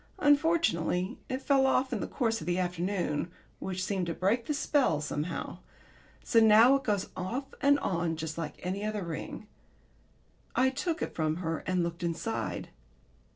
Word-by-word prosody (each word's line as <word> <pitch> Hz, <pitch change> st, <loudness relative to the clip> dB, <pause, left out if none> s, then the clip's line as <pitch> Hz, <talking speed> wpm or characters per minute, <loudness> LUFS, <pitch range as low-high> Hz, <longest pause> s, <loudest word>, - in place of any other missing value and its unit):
Unfortunately 285 Hz, -, +2 dB
it 260 Hz, +1 st, -3 dB
fell 270 Hz, -2 st, +4 dB
off 265 Hz, 0 st, +2 dB
in 225 Hz, -, -1 dB
the -, -, -3 dB
course 225 Hz, -4 st, -1 dB
of 155 Hz, -, -7 dB
the 175 Hz, 0 st, +1 dB
afternoon, 180 Hz, -3 st, -1 dB, 0.3 s
which 185 Hz, -1 st, -3 dB
seemed 185 Hz, -2 st, -1 dB
to 165 Hz, -, -2 dB
break 225 Hz, +6 st, +1 dB
the 300 Hz, -, 0 dB
spell 280 Hz, -, +2 dB
somehow. 150 Hz, +3 st, -4 dB, 0.6 s
So 230 Hz, -, +4 dB
now 220 Hz, +3 st, +7 dB
it 275 Hz, -, -9 dB
goes 205 Hz, -4 st, 0 dB
off 245 Hz, +10 st, -4 dB
and 285 Hz, 0 st, +5 dB
on 170 Hz, -5 st, 0 dB
just 160 Hz, 0 st, -4 dB
like 165 Hz, -2 st, -4 dB
any 190 Hz, +3 st, -2 dB
other 210 Hz, -2 st, -2 dB
ring. 170 Hz, +5 st, -6 dB, 1.1 s
I 260 Hz, +1 st, +4 dB
took 325 Hz, +5 st, -2 dB
it -, -, -4 dB
from 155 Hz, -1 st, 0 dB
her 165 Hz, -2 st, -2 dB
and 185 Hz, -1 st, +1 dB
looked 170 Hz, +1 st, -4 dB
inside. 175 Hz, +6 st, -3 dB
195 Hz, 165 wpm, -30 LUFS, 170-255 Hz, 1.1 s, now